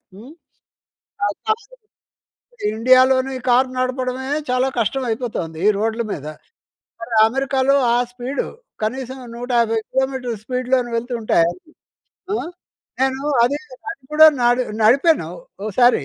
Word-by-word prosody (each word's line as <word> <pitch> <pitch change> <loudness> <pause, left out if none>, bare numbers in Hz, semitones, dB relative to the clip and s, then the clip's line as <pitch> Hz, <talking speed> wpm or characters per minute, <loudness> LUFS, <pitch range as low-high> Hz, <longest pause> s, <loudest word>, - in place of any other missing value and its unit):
హ్మ్, 235 +9 -12 0.9
అలా 205 - -1
చేసి 475 -1 -24 0.7
ఇండియాలోని 255 +3 +4 0.2
కార్ 250 +2 +4
నడపడమే 255 0 -2 0.2
చాలా 255 +1 +2
కష్టవయిపోతోంది 225 -8 -2
ఈ - - +7
రోడ్ల 225 +2 -1
మీద. 150 - -5 0.8
మరి 230 +1 -6
అమెరికాలో 270 +2 +1 0.2
ఆ - - +3
స్పీడు. 250 +3 -4 0.4
కనీసం 260 +3 -3 0.2
150 235 -2 +1
కిలోమీటర్ల 265 -2 -1
స్పీడ్‌లోను 250 +1 0
వెళ్తుంటే, 230 -4 0 1.0
ఆ! - - +1 0.6
నేను 265 0 +1 0.2
అదీ 265 +4 +1 0.3
అది 325 - -9
కూడా 315 +1 +8 0.2
నడి 245 +1 +3 0.2
నడిపాను 275 +9 +4 0.3
ఓ - - -3
సారి. 245 - +5
255 Hz, 110 wpm, -20 LUFS, 235-265 Hz, 1.0 s, కూడా